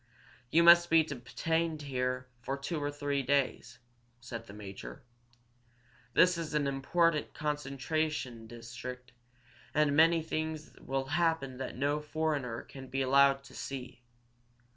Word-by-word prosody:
"You 170 +5 +5
must 170 0 +8
be 165 0 +6
detained 155 +4 -2
here 125 -2 -2
for 135 +3 -3
two 150 +3 -3
or 145 - 0
three 145 -1 -1
days," 130 -2 0 0.4
said 115 -1 -7
the - - -10
major. 95 -12 -9 1.1
"This 180 +3 +5
is 160 -2 -4
an 150 -1 +2
important 150 +3 +1
concentration 145 -4 -2
district, 120 +2 -8 0.6
and 150 -1 +3
many 165 +1 +5
things 155 -1 -4
will 135 0 -2
happen 160 -6 +1
that 135 - -5
no 145 +2 +1
foreigner 150 -6 -2
can 135 -1 -11
be 135 +1 -1
allowed 135 +1 +5
to - - -15
see. 125 -3 -7
140 Hz, 130 wpm, -32 LUFS, 125-155 Hz, 1.1 s, must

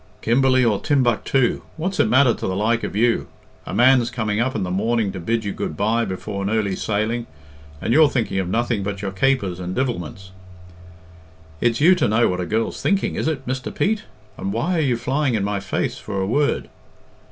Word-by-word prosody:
"Kimberley 130 +1 +3
or 105 -4 +2
Timbuctoo, 130 -2 +1 0.2
what's 185 +4 -3
it - - +4
matter 130 0 +5
to - - -4
the 95 - -2
like 115 +4 +1
of - - -4
you? 115 +2 +2 0.4
A - - -5
man's 125 -1 +5
coming 110 -3 -2
up 130 +3 0
in 105 - -1
the 90 - -3
morning 110 +2 0
to 95 - -6
bid 110 +5 -1
you 100 - -2
good 75 - -4
bye 115 +3 +1
before 100 +2 -5
an 100 - -1
early 105 -3 0
sailing, 110 +4 -2 0.5
and 115 - -1
you're 155 +1 +6
thinking 110 -8 -1
of 90 -2 -2
nothing 115 0 0
but 100 0 -4
your 100 - -2
capers 100 -4 0
and 90 0 -4
divilments." 95 -7 -3 1.3
"It's 120 +2 +1
you 175 +5 +7
to 180 - +1
know 110 +3 +3
what 90 0 -2
a 90 - -4
girl's 110 +3 -1
thinking, 200 -1 +1
isn't 160 - 0
it, 135 -4 -6
Mr. 130 0 -3
Pete? 215 +1 -1 0.3
And 95 - -3
why 165 - 0
are - - +2
you 130 -5 +1
flying 130 +1 0
in 105 - 0
my 100 0 -1
face - - -2
for 100 -2 -4
a 95 - 0
word?" 140 +8 0
115 Hz, 210 wpm, -21 LUFS, 100-130 Hz, 1.3 s, you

